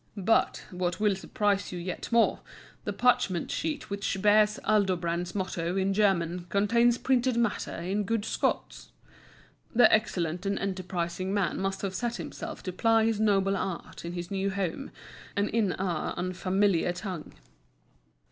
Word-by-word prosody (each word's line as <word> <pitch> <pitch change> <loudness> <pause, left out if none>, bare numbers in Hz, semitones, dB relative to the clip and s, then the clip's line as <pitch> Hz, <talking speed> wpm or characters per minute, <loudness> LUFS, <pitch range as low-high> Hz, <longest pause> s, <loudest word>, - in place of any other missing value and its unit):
But, 200 +3 +2
what 180 0 -2
will 210 -2 +3
surprise 200 +1 -1
you 180 - -5
yet 175 +5 -5
more, 230 -1 +3 0.5
the - - -1
parchment 245 -8 +2
sheet 305 -9 -3
which 200 -1 -2
bears 210 +1 +4
Aldobrand's 180 -4 +1
motto 185 -2 -2
in 195 +1 +1
German 180 -4 +1
contains 235 +5 +3
printed 255 -2 +1
matter 235 -3 0
in 190 +5 -1
good 225 0 -1
Scots! - - -2 0.9
This 245 -1 +8
excellent 180 -4 0
and 200 - 0
enterprising 185 -1 -3
man 190 -5 0
must 195 +1 -2
have 195 -1 -2
set 240 +4 -2
himself - - -7
to 185 - -4
ply 225 +3 +3
his 225 -2 +1
noble 195 -2 +3
art 190 -2 -5
in 170 +1 -5
his 175 +1 -5
new 195 0 0
home, 195 +6 -3 0.5
and 200 0 +1
in 215 -5 +1
our 180 -4 -2
unfamiliar 185 0 +1
tongue. 180 -3 -6
195 Hz, 145 wpm, -28 LUFS, 180-215 Hz, 0.9 s, This